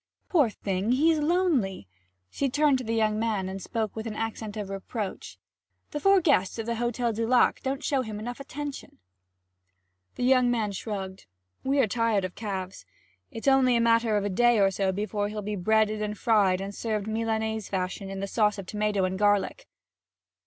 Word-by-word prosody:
'Poor 295 - +4
thing 200 +2 -1
he's 315 +4 +3
lonely!' 295 - +1 0.4
She 275 - -1
turned 290 0 +3
to - - -5
the 230 -1 -2
young 215 -1 +1
man 215 -4 -1
and 190 +1 -5
spoke 220 -1 -3
with 220 +1 -5
an 215 - -5
accent 220 -1 -4
of 200 -2 -5
reproach. 195 - -5 0.5
'The 295 - -3
four 390 +3 +5
guests 255 - +2
of 225 - -3
the 235 0 -2
Hotel 240 0 -1
du 225 +1 -2
Lac 250 0 +3
don't 270 +2 -3
show 275 -2 +1
him 220 -4 -6
enough 240 +4 -6
attention.' 285 +1 -7 1.2
The - - -3
young 250 -1 +4
man 225 -4 0
shrugged. 195 - -6 0.4
'We're 270 -1 +3
tired 220 -2 +1
of 185 - -6
calves. 190 -3 -5 0.5
It's 230 -1 -7
only 265 -2 +5
a - - +3
matter 230 -2 +3
of 205 - -1
a - - 0
day 240 +3 +3
or 195 -1 +4
so 190 0 0
before 205 +1 -2
he'll 210 0 -5
be 210 +1 -3
breaded 215 +2 +2
and 210 0 -3
fried 200 -6 +3
and 195 +1 -5
served 215 -1 -2
Milanese 220 -1 -2
fashion 190 +1 -3
with 195 0 -5
a - - -2
sauce 210 0 +1
of 195 - -6
tomato 210 0 0
and 185 +1 -3
garlic.' 205 - +1
220 Hz, 190 wpm, -27 LUFS, 200-245 Hz, 1.2 s, four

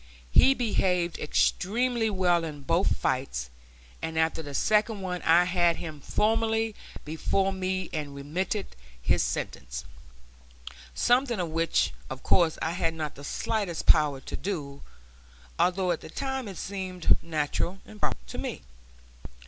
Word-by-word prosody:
He 270 - +6
behaved 180 -8 +1
extremely 225 +9 +1
well 180 -4 +2
in 150 -3 -6
both 170 +6 +2
fights, 95 - -1 0.5
and 160 0 -3
after 160 0 +2
the 145 -2 -7
second 215 +2 +2
one 180 -1 -3
I 170 +2 +6
had 175 -1 +3
him 155 -3 -7
formally 225 +4 +1 0.3
before 190 +5 0
me 185 0 -2
and 145 -3 -4
remitted 180 +8 -3 0.2
his - - +2
sentence - - -3 1.1
something 245 -1 +3 0.2
which 165 - +2 0.2
of - - -7
course 170 -3 +3
I 160 - 0
had 165 -2 -1
not 155 -2 -3
the 140 - -12
slightest 195 +3 -2
power 150 -4 +5
to - - -6
do, 145 -8 -4 0.8
although 185 0 +2
at 170 - -2
the - - -10
time 265 - -3
it 195 -3 -7
seemed 185 -3 0
natural 165 +3 -1
and 215 - -13
proper - - 0
to - - -8
me. - - -4
175 Hz, 140 wpm, -28 LUFS, 155-200 Hz, 1.1 s, He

